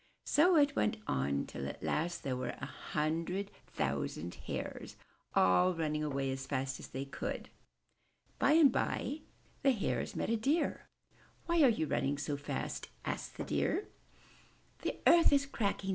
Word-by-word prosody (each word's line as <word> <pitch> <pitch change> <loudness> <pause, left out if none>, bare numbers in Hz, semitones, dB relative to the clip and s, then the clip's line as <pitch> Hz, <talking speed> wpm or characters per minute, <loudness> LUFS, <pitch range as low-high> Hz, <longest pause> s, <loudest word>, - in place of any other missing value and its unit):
So 345 +4 +5
it 290 -2 +4
went 225 - +1
on, 70 +1 0
till 70 - -5
at - - -7
last 175 +3 -1
there 130 -2 -1
were 130 0 -3
a - - -4
hundred 165 +7 -2 0.2
thousand 85 +3 -2
Hares - - -5 0.4
all 180 - +5
running 155 -2 -1
away 135 -2 -1
as 135 0 -5
fast 135 -1 -2
as - - -8
they 135 +1 -5
could. 135 - -5 0.9
By 285 - +5
and 310 -4 +7
by 285 +4 -1 0.4
the 275 - +4
Hares 215 - -2
met - - -1
a 230 - +2
Deer. 285 +9 0 0.6
''Why 340 -1 +3
are 275 - +8
you 215 -9 +1
all - - -8
running 140 +1 +1
so 145 0 -2
fast?*' 145 +1 -4 0.2
asked - - -4
the - - -3
Deer. 415 - 0 0.9
'The - - -3
earth 340 -1 +7
is 280 -1 +4
cracking!" 200 -7 -2
165 Hz, 160 wpm, -34 LUFS, -, 0.9 s, are